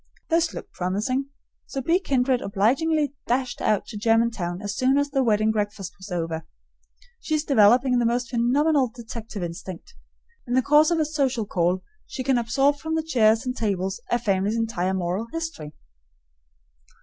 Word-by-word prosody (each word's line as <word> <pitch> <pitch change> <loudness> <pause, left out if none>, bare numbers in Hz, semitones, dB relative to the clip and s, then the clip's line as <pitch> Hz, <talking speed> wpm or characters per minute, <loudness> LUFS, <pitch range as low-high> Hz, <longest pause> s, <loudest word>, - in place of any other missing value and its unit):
This 330 0 +2
looked - - -9
promising, 210 +9 -1 0.4
so 270 - -4
B. 330 +7 +2
Kindred 260 -7 +1
obligingly 275 +10 +1
dashed 250 0 -1
out 210 - +1
to 215 - -8
Germantown 225 -5 +1
as 205 0 -4
soon 260 +2 +2
as 285 0 0
the 270 -1 +2
wedding 215 -2 +2
breakfast 205 -3 -3
was 190 +2 -10
over. 165 -2 -2 0.8
She 310 - -1
is 300 - 0
developing 250 0 +4
the 240 - +1
most 245 +1 -1
phenomenal 265 +4 +2
detective 230 -3 -7
instinct. 170 +1 -7 0.5
In 245 - 0
the 260 - +3
course 300 +4 +5
of 340 - +1
a 310 - +2
social 270 -7 0
call 180 0 0 0.2
she 260 - -5
can 260 -1 +2
absorb 270 +5 +2
from 320 +2 -3
the 320 - 0
chairs 225 -5 +3
and 250 0 -2
tables 195 -1 -2
a 240 - +2
family's 205 -2 0
entire 190 -5 -1
moral 185 +5 -2
history. 320 - -5
235 Hz, 165 wpm, -24 LUFS, 205-275 Hz, 0.8 s, course